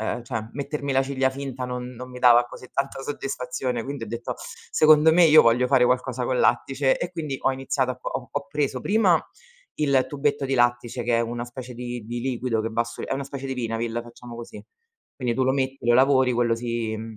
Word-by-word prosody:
ehm, 115 +2 -2
cioè 115 -4 -4
mettermi 140 +1 -4
la 135 0 +3
ciglia 135 -1 0
finta 130 -1 -5
non 125 0 -5
non 125 +1 -9
mi 125 - -9
dava 120 -1 +6
così 125 +1 -12
tanta 140 0 -2
soddisfazione, 125 -3 -3
quindi 140 -3 -6
ho - - -4
detto: 115 +2 -4
"Secondo 155 0 +3
me 175 +1 +6
io 155 -1 +8
voglio 120 +2 +3
fare 130 -2 +5
qualcosa 125 0 0
col 125 0 0
lattice." 135 +3 +2
E 175 - -4
quindi 155 -6 -4
ho 135 - +2
iniziato 130 0 -1
a 125 - -13
ho 125 - -4
ho 145 0 -3
preso 140 -3 -1
prima 200 - +3 0.6
il 140 -3 +2
tubetto 145 0 -1
di 135 - -2
lattice 120 0 +1
che 120 0 +1
è - - +2
una 120 +1 -3
specie 125 +1 -8
di 120 -1 -6
di 120 +2 -5
liquido 125 -3 -1
che 110 - -2
va 115 +1 0
su 120 - -9
è - - -2
una 135 0 -3
specie 135 0 -6
di 135 - -3
vinavil, 115 -1 -2
facciamo 120 0 -12
così. 120 0 -9 0.5
Quindi 125 -3 -1
tu 130 - 0
lo 130 - +2
metti, 135 0 -1
lo 120 - +5
lavori, 130 0 +4
quello 120 -1 +2
si, 115 -1 -3
mhmm, 110 0 -8
125 Hz, 220 wpm, -24 LUFS, 120-135 Hz, 0.6 s, io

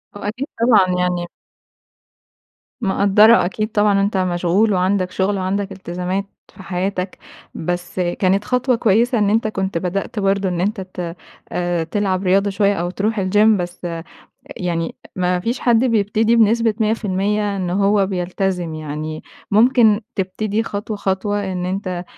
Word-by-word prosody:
آه، 205 - -6
أكيد 255 +7 -4
طبعًا 215 -6 +5
يعني 180 -1 -1 1.5
مِقدّرة 200 +1 +5
أكيد 215 +3 -2
طبعًا 205 -2 +3
أنت 200 0 0
مشغول، 185 +3 +1
وعندك 185 0 +1
شغل 195 +1 0
وعندك 195 +1 -2
التزامات 185 +1 -3 0.3
في 190 - -12
حياتك. 185 0 -3 0.4
بس 175 +2 -4
كانت 185 +3 +1
خطوة 250 0 +1
كويسة 230 +2 +2
إن 205 -1 +2
أنت 220 +1 +2
كنت 195 -4 -2
بدأت 195 +4 -3
برضه 195 -1 +1
إن 175 -1 -2
أنت 205 +1 -1
ت 180 -2 -6 0.4
آآ 175 -2 -1
تلعب 190 +2 -1
رياضة 195 +2 +3
شوية، 200 +1 +2
أو 175 -1 -2
تروح 210 +3 -1
الgym، 205 +3 +3
بس 175 0 -5 0.7
يعني 170 -2 -2 0.2
ما 180 -1 +1
فيش 235 +7 -2
حد 235 0 +3
بيبتدي 220 0 +2
بنسبة 225 0 +3
100% 210 -1 0
إن 180 -2 -2
هو 200 +1 +2
بيلتزم. 180 -2 -2
يعني 155 0 -5 0.3
ممكن 225 -1 +4
تبتدي 210 +3 -1
خطوة، 210 0 -4
خطوة 200 0 -1
إن 180 -1 -3
أنت 185 -1 -3
195 Hz, 140 wpm, -19 LUFS, 180-210 Hz, 1.5 s, طبعًا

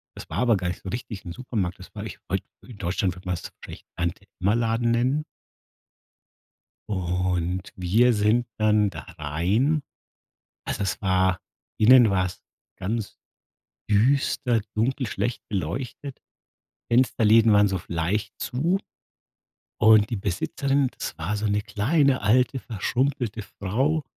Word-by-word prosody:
das - - -10
war - - -3
aber 120 -4 +3
gar 90 -1 -3
nicht 90 - -4
so 95 - -5
richtig 105 -3 -5
'n 85 - -6
Supermarkt. 100 -4 -3
Das - - -13
war - - -5
ich - - -8
wollte - - -1 0.2
in 120 -5 -11
Deutschland, 90 0 -1
würde 90 - -14
man 90 - 0
das 85 - -8
vielleicht - - -10
Tante-Emma-Laden 105 +6 0
nennen. 130 +6 +1 1.7
Und 90 -1 -1
wir 110 +8 +3
sind 110 +3 +2
dann 105 -1 +3
da - - -8 0.2
rein, 95 - +1 0.9
also 100 - -2
es 95 -1 -2
war, 95 -1 +2 0.4
innen 120 +1 +7
war 95 -1 +2
es 90 - -7 0.4
ganz 110 +2 -3 0.7
düster, 120 +1 +2
dunkel, 130 +4 0
schlecht 110 +3 -2
beleuchtet. 120 - -4 0.7
Fensterläden 115 -2 +4
waren 105 0 +5
so 95 -2 -2
leicht 95 +7 -1
zu. 160 +10 0 1.0
Und 110 -1 +6
die 120 - -1
Besitzerin, 135 +8 0
das - - -5
war 85 +7 -2
so 105 - -3
'ne 105 0 +1
kleine 130 +7 +2
alte, 125 +5 +3
verschrumpelte 120 +1 -2
Frau, 130 - -1
105 Hz, 135 wpm, -25 LUFS, 95-125 Hz, 1.7 s, innen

